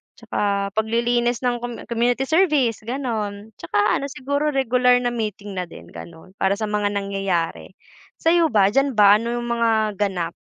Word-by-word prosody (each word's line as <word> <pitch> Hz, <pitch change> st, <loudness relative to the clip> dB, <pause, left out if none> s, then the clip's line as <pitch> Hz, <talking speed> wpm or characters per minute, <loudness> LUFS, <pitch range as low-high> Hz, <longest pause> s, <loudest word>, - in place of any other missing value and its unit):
tsaka 200 Hz, -3 st, -2 dB
paglilinis 235 Hz, +2 st, +1 dB
ng 245 Hz, -1 st, +1 dB
com 240 Hz, 0 st, -5 dB, 0.2 s
community 240 Hz, +3 st, +1 dB
service 300 Hz, -, +2 dB
gano'n. 220 Hz, -5 st, -4 dB
Tsaka 165 Hz, +4 st, -2 dB, 0.2 s
ano 280 Hz, -, -4 dB
siguro 285 Hz, +3 st, -2 dB
regular 250 Hz, -2 st, +3 dB
na -, -, +1 dB
meeting 210 Hz, -4 st, -5 dB
na -, -, -1 dB
din -, -, -13 dB
gano'n 170 Hz, +2 st, -12 dB
para 195 Hz, +1 st, +2 dB
sa 215 Hz, 0 st, -3 dB
mga 210 Hz, -1 st, 0 dB
nangyayari. 195 Hz, -4 st, -2 dB, 0.5 s
Sa'yo 335 Hz, 0 st, +3 dB
ba, 205 Hz, -6 st, +3 dB
diyan 275 Hz, 0 st, +1 dB
ba 205 Hz, 0 st, +6 dB
ano 235 Hz, +1 st, -3 dB
'yung 240 Hz, -, -3 dB
mga 220 Hz, -3 st, +1 dB
ganap? 180 Hz, -5 st, -1 dB
225 Hz, 160 wpm, -22 LUFS, 200-250 Hz, 0.5 s, ba